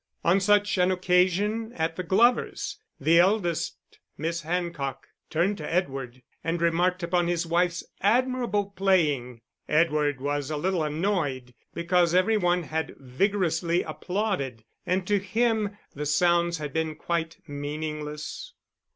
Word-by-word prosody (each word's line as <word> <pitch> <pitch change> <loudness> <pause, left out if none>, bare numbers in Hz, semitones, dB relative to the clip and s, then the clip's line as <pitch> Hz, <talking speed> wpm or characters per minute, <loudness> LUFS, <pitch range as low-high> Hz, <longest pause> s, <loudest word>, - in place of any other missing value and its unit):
On 180 +4 +4
such 205 0 +3
an 180 0 +4
occasion 185 +5 +1
at 160 0 -1
the 185 - -3
Glovers, 240 - +1 0.2
the 165 +1 +4
eldest 175 -3 +1 0.4
Miss 165 +2 -2
Hancock 160 -5 -3 0.2
turned 180 +5 0
to 150 - -5
Edward 135 -8 -2 0.2
and 165 +1 -1
remarked 175 +2 +1
upon 175 0 +1
his 175 -1 0
wife's 170 +1 +1 0.2
admirable 230 -2 +1
playing. 150 - +1 0.3
Edward 150 -3 +2
was 145 +1 -2
a 155 - -2
little 185 +2 0
annoyed, 150 -6 -1 0.2
because 175 0 +2
every 185 +5 +4
one 175 -3 +2
had 160 +1 -3
vigorously 170 +4 0
applauded, 155 - -3 0.2
and 185 0 +1
to 205 +1 +2
him 215 +1 0 0.2
the 150 +1 -4
sounds 170 +2 +2
had 150 -2 -6
been 160 -1 -1
quite 165 0 -2
meaningless. 150 - -5
170 Hz, 130 wpm, -26 LUFS, 155-190 Hz, 0.4 s, On